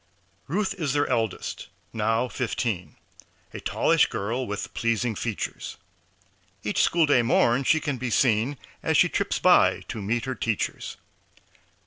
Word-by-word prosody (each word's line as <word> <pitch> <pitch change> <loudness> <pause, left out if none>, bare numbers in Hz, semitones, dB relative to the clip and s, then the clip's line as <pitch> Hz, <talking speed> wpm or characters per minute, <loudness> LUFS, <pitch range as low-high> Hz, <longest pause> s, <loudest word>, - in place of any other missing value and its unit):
Ruth 190 +6 0
is 145 -5 0
their 145 0 +2
eldest 110 -4 -2 0.3
now 115 +2 +1
fifteen, 115 - -3 0.6
A - - -6
tallish - - +2
girl 120 +6 -3
with 105 0 -5
pleasing 115 0 0
features. 110 0 -4 0.9
Each - - +1
school 170 -2 +4
day 145 -4 +4
morn 120 +2 +3
she 160 - +4
can 145 -3 -2
be 130 0 -2
seen 115 +4 +2 0.2
As - - +1
she - - +5
trips - - -1
by - - +4
to 110 - -4
meet 115 +4 -1
her 130 - -2
teachers. 115 -4 -3
120 Hz, 140 wpm, -26 LUFS, 110-135 Hz, 0.9 s, she